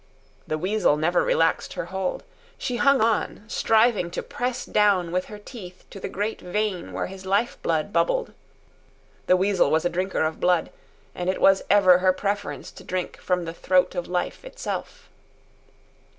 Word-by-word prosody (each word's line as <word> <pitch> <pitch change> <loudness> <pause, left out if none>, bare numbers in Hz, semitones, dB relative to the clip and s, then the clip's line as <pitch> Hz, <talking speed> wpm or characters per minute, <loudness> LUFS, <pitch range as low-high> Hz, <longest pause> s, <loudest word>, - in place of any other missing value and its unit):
The 155 - -1
weasel 185 -2 +2
never 170 +3 +2
relaxed 165 0 +1
her - - -4
hold. 190 -1 -2 0.3
She 245 - -3
hung 275 -1 +4
on, 220 -2 0
striving 220 -5 +2
to - - -4
press 250 0 -3
down 195 -5 +2
with 185 +1 0
her 210 - -9
teeth 200 -4 -11
to 195 - -9
the - - -5
great 205 +3 -3
vein 195 0 -2
where - - -2
his 190 0 -9
life 200 +5 0
blood 165 +4 -1
bubbled. - - +1 0.9
The 185 - +5
weasel 195 0 +2
was 160 +2 +1
a - - +3
drinker 185 0 -1
of 160 0 -2
blood, 180 -2 +2 0.4
and 180 0 -3
it 190 - -1
was 195 0 +5
ever 185 -3 +6
her 185 0 +3
preference 205 +2 -3
to - - -13
drink 185 0 -4
from 180 -2 -1
the 165 - -5
throat 180 +1 +2
of 175 -2 -3
life 180 - -3
itself. - - -6
190 Hz, 170 wpm, -24 LUFS, 180-210 Hz, 0.9 s, ever